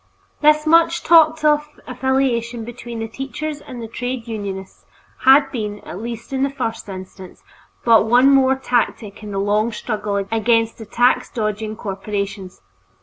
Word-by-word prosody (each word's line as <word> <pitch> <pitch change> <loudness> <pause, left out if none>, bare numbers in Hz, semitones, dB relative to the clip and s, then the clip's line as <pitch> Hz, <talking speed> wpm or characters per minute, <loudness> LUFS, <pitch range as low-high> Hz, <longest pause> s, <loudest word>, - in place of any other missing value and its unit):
This 305 0 +4
much 330 +1 +4
talked 320 -2 +5
of 300 0 +1
affiliation 245 -3 -1
between 240 0 -8
the 225 0 -4
teachers 285 +5 -6
and 255 -2 -9
the - - -6
trades 245 +1 -5
unionists 200 -4 -6 0.4
had 270 +1 +6
been, 210 -4 -4
at 185 - -8
least 235 +2 -7
in 265 - -1
the 275 - +2
first 245 -6 -4
instance, 185 -1 -10 0.4
but 225 -2 +5
one 250 +4 +5
more 265 -1 +4
tactic 235 -5 -2
in 210 - -8
the 200 - -4
long 210 +3 +1
struggle 210 -2 -3 0.2
against 225 0 +1
the 220 - -9
tax 245 +3 +2
dodging 215 -1 -3
corporations. 195 - -5
235 Hz, 150 wpm, -20 LUFS, 210-270 Hz, 0.4 s, had